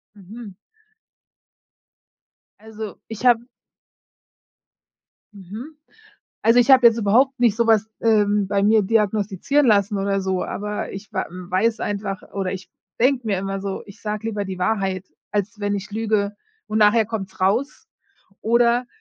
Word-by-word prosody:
Mhm. 205 +1 -11 2.0
Also, 220 -1 -8
ich 225 +2 -7
habe 240 -1 +5 1.9
Mhm. 210 - -10 0.7
Also, 230 +2 +5
ich 245 +3 +4
habe 255 -2 +8
jetzt 230 - +2
überhaupt 245 +5 +3
nicht 235 -4 +3
so 235 -1 +1
was, 220 -1 +3
ähm, 210 -3 +2
bei 200 0 +1
mir 215 +1 +4
diagnostizieren 210 +6 +1
lassen 205 -1 +3
oder 195 0 0
so, 190 -1 -1
aber 210 0 -4
ich 195 +2 -9
wa - - -2
weiß 185 +5 -1
einfach 200 -1 -3
oder 195 -2 -3
ich 190 0 -8 0.3
denke 250 -1 +2
mir 200 -3 +1
immer 195 +1 -3
so, 195 -1 -5
ich 200 - -15
sage 215 +1 -4
lieber 205 -2 -3
die 190 -1 -6
Wahrheit, 190 -1 -1 0.3
als 210 +1 -2
wenn 205 0 -1
ich 200 +2 -6
lüge 210 -1 -1 0.3
und 215 - -1
nachher 215 +1 +4
kommt's 195 -4 -6
raus. 225 +10 0 0.5
Oder, 235 +1 +2
210 Hz, 140 wpm, -22 LUFS, 195-225 Hz, 2.0 s, habe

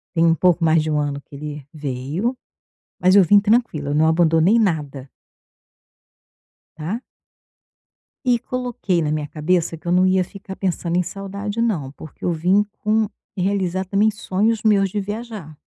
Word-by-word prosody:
Tem 165 - +3
um 165 0 +4
pouco 175 0 +2
mais 160 0 +4
de 155 - -2
1 150 - +1
ano 145 -1 -2
que 140 - -15
ele 150 -1 -7
veio. 150 - -3 0.6
Mas 185 +2 +4
eu 200 - +8
vim 205 +4 +6
tranquila, 200 -10 +1
não 155 +2 +3
abandonei 165 +5 +4
nada. 150 - -1 1.7
Tá? 180 +11 -4 1.2
E 245 -2 +3
coloquei 245 -9 -2
na 150 -1 -1
minha 150 -1 -2
cabeça 165 +2 0
que - - -25
eu 175 - -1
não 185 +1 +4
ia 185 0 +3
ficar 190 +1 -10
pensando 175 -3 -2
em 180 - +2
saudade 200 +4 -5
não, 165 - -1
porque 155 +1 -13
eu 175 - +1
vim 180 +5 +2 0.2
com 215 0 +1 0.3
realizar 190 -1 0
também 200 +3 +2
sonhos 215 +1 0
meus 200 -3 +3
de 205 +2 -2
viajar. 205 -6 -7
180 Hz, 160 wpm, -21 LUFS, 155-205 Hz, 1.7 s, eu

